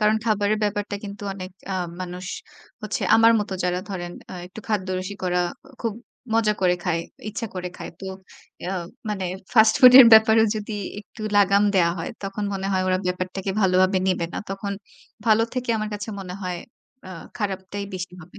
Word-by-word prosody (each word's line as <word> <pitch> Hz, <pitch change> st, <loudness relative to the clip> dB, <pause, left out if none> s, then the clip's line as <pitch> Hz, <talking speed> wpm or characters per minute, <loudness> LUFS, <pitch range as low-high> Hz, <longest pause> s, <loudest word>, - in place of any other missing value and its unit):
কারণ 215 Hz, +1 st, +4 dB
খাবারের 210 Hz, -1 st, +1 dB
ব্যাপারটা 205 Hz, 0 st, -1 dB
কিন্তু 200 Hz, 0 st, -8 dB
অনেক 185 Hz, -1 st, -7 dB, 0.2 s
আ -, -, -1 dB, 0.3 s
মানুষ 180 Hz, 0 st, -6 dB, 0.6 s
হচ্ছে 215 Hz, 0 st, -3 dB
আমার 225 Hz, +1 st, +6 dB
মত 205 Hz, -, -3 dB
যারা 180 Hz, 0 st, 0 dB
ধরেন 175 Hz, -3 st, -5 dB, 0.2 s
আ -, -, -6 dB
একটু 205 Hz, +4 st, -10 dB
খাদ্যরসিক 185 Hz, -1 st, -2 dB
ওরা 180 Hz, 0 st, +1 dB, 0.4 s
খুব 230 Hz, -3 st, -1 dB, 0.4 s
মজা 220 Hz, -2 st, +3 dB
করে 180 Hz, -1 st, +4 dB
খায়, 170 Hz, -2 st, 0 dB, 0.3 s
ইচ্ছা 220 Hz, +2 st, -4 dB
করে 180 Hz, 0 st, -4 dB
খায়। -, -, -7 dB
তো 195 Hz, -, -6 dB, 0.6 s
এ -, -, -6 dB
আ -, -, -1 dB, 0.3 s
মানে 200 Hz, -3 st, -2 dB, 0.3 s
ফাস্ট 220 Hz, -2 st, +6 dB
ফুড 250 Hz, -2 st, +10 dB
এর 245 Hz, -, +10 dB
ব্যাপারেও 220 Hz, 0 st, +7 dB
যদি 215 Hz, +1 st, -5 dB, 0.3 s
একটু 215 Hz, +2 st, -16 dB, 0.2 s
লাগাম 200 Hz, 0 st, +5 dB
দেয়া 170 Hz, -2 st, +4 dB
হয়, 165 Hz, -, -4 dB
তখন 195 Hz, +1 st, -3 dB
মনে 195 Hz, 0 st, -3 dB
হয় 185 Hz, -1 st, +2 dB
ওরা 185 Hz, 0 st, +2 dB
ব্যাপারটাকে 185 Hz, +2 st, -2 dB
ভালোভাবে 185 Hz, 0 st, +4 dB
নেবে 175 Hz, -2 st, 0 dB
না। -, -, -3 dB
তখন 200 Hz, +1 st, -3 dB, 0.5 s
ভালো 220 Hz, 0 st, +5 dB
থেকে 250 Hz, -2 st, -2 dB
আমার 215 Hz, 0 st, -2 dB
কাছে 205 Hz, +2 st, -6 dB
মনে 180 Hz, -1 st, -7 dB
হয় 180 Hz, -1 st, -3 dB, 0.5 s
আ -, -, -8 dB, 0.3 s
খারাপটাই 200 Hz, 0 st, -3 dB
বেশি 180 Hz, 0 st, -5 dB
হবে। 170 Hz, -, -15 dB
195 Hz, 180 wpm, -24 LUFS, 185-215 Hz, 0.6 s, ফুড